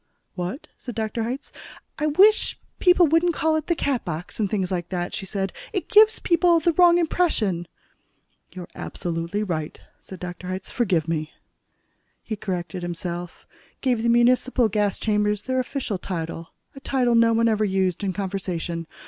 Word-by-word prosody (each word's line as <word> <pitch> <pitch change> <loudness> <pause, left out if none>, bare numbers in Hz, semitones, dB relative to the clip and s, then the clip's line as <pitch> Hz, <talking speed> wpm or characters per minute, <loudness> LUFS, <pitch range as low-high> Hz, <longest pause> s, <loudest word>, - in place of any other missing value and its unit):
"What?" 180 - -5
said 245 - -7
Dr. 225 +1 -2
Hitz. 270 +4 -6 0.5
"I 300 - +1
wish 395 +8 +4 0.2
people 360 -1 +5
wouldn't 330 +2 +2
call 315 0 +1
it 315 0 -2
'the 340 - +2
Catbox,' 180 - -3
and 205 -3 +1
things 190 -3 -1
like 175 -2 -2
that," 175 -2 -3
she 195 - -5
said. 195 0 -2 0.2
"It 380 - -3
gives 435 -1 +6
people 340 0 +3
the 335 +1 +2
wrong 345 0 +6
impression." 235 - 0 0.8
"You're 180 -2 -8
absolutely 170 +4 -3
right," 160 -6 -4 0.2
said 190 - -11
Dr. 180 0 -7
Hitz. 185 +1 -5
"Forgive 185 -10 +1
me." 155 -2 -2 0.9
He 220 - -4
corrected 185 -2 -4
himself, 175 0 -5 0.4
gave 250 -4 +1
the 235 - +1
municipal 240 0 +3
gas 210 -2 0
chambers 210 -1 0
their 260 0 -1
official 250 -6 -3
title, 165 -2 -5 0.3
a - - -9
title 255 -3 +1
no 230 0 +5
one 230 +1 +3
ever 215 -1 +2
used 190 -2 0
in 195 - 0
conversation. 180 -4 -4
210 Hz, 160 wpm, -24 LUFS, 180-265 Hz, 0.9 s, gives